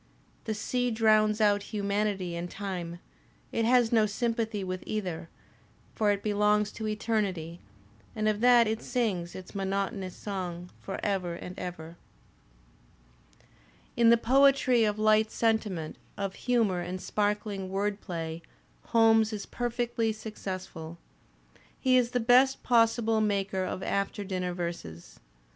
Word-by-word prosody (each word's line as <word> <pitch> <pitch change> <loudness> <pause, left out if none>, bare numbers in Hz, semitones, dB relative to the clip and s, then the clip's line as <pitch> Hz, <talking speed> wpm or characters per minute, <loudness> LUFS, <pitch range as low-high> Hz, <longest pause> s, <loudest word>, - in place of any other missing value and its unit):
The 220 - -2
sea 245 +3 -1
drowns 215 -1 +3
out 205 -1 +3
humanity 200 -3 -2
and 170 +1 -4
time; 180 -4 -5 0.5
it 230 - 0
has 245 -1 +4
no 220 -2 +4
sympathy 225 -1 -1
with 185 -1 -4
either; 180 -6 -3 0.6
for 215 -1 +1
it 200 -1 0
belongs 210 0 +2
to 220 - -5
eternity, 205 -6 -2 0.6
and 215 -1 0
of 215 0 0
that 240 -1 +6
it 220 0 -2
sings 200 -9 -2
its 185 - -9
monotonous 195 -1 -2
song 180 -3 -5
for 195 - -6
ever 185 -4 -1
and 180 +1 -8
ever. 170 -2 -7 2.0
In 235 -1 +5
the 235 - +7
poetry 255 -1 +4
of 210 0 0
light 215 0 +4
sentiment, 215 -10 -1 0.2
of 195 -1 -3
humour 225 -7 +1
and 180 +1 -4
sparkling 205 -1 -2
word 200 +1 -1
play 165 -3 -5 0.4
Holmes 225 -1 +4
is 210 -2 -5
perfectly 240 -2 -1
successful. 185 -6 -7 0.8
He 260 -1 +3
is 245 -2 +4
the 245 - 0
best 255 +3 +4
possible 230 -2 +3
maker 195 -2 0
of 185 - -4
after 200 +1 -1
dinner 185 -2 -3
verses. 85 - -6
210 Hz, 130 wpm, -29 LUFS, 185-225 Hz, 2.0 s, the